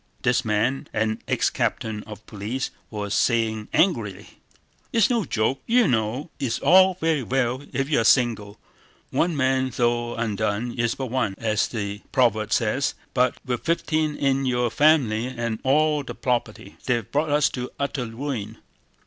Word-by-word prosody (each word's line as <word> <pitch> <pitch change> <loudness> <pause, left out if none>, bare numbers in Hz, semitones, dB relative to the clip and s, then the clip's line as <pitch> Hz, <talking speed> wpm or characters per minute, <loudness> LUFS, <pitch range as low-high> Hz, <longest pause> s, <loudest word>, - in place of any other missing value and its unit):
This 125 0 +2
man, 110 +5 0
an 110 0 -1
ex - - +1
captain 110 -2 -2
of 110 0 -11
police, 110 +5 -4 0.2
was 105 -2 -4
saying 110 -3 +1
angrily: 105 - 0 0.6
"It's 230 +1 +3
no 230 -5 +1
joke, 120 +2 0
you 240 -2 +4
know! 120 +5 -1
It's 135 -5 -1
all 185 +1 +5
very 160 -4 0
well 130 +1 -1
if 135 0 -1
you're 140 -6 +2
single. 110 -4 +2 0.5
'One 170 -1 +1
man 130 -1 +1
though 120 -1 0
undone 110 +1 -1
is 120 -1 -1
but 130 -3 -5
one,' 125 -7 0
as 110 -2 0
the 100 -3 -4
proverb 110 -4 +2
says, 115 +5 +1 0.2
but 125 -1 +2
with 125 -2 -2
thirteen 155 -2 0
in 135 -1 +1
your 120 -2 +1
family 130 -7 +3
and 115 -3 -3
all 150 +2 +3
the 135 - -8
property... 120 -6 -3
They've 120 -5 0
brought 150 +2 0
us 145 0 +3
to 125 -1 -5
utter 140 -3 -2
ruin! 120 -2 -5
125 Hz, 155 wpm, -24 LUFS, 110-140 Hz, 0.6 s, all